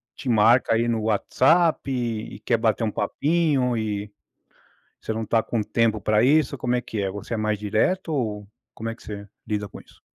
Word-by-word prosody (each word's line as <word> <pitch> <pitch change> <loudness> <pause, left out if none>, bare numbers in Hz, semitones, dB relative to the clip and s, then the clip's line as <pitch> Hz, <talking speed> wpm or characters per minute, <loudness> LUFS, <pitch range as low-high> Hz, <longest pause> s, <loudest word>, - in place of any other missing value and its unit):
te 135 - -5
marca 115 +2 +4
aí 115 +1 +1
no 115 -2 0
WhatsApp 135 - +2
e 115 -5 -3
quer 115 - +2
bater 115 +1 +1
um 110 - 0
papinho 145 -3 +1
e 105 -2 -3 0.9
você 110 - -3
não 110 0 -3
tá 115 +1 +2
com 115 0 -2
tempo 110 -1 +1
pra 105 +1 +2
isso, 145 0 +3
como 125 -1 -1
é 125 - +1
que 110 -3 -5
é? 95 - -1
Você 105 +4 -6
é - - 0
mais 110 -1 -1
direto? 110 - 0
Ou 105 -7 -2 0.3
como 115 - -5
é 115 - -3
que - - -19
você 100 -1 -8 0.2
lida 105 -1 -2
com - - -11
isso? - - -21
115 Hz, 200 wpm, -24 LUFS, 105-125 Hz, 0.9 s, marca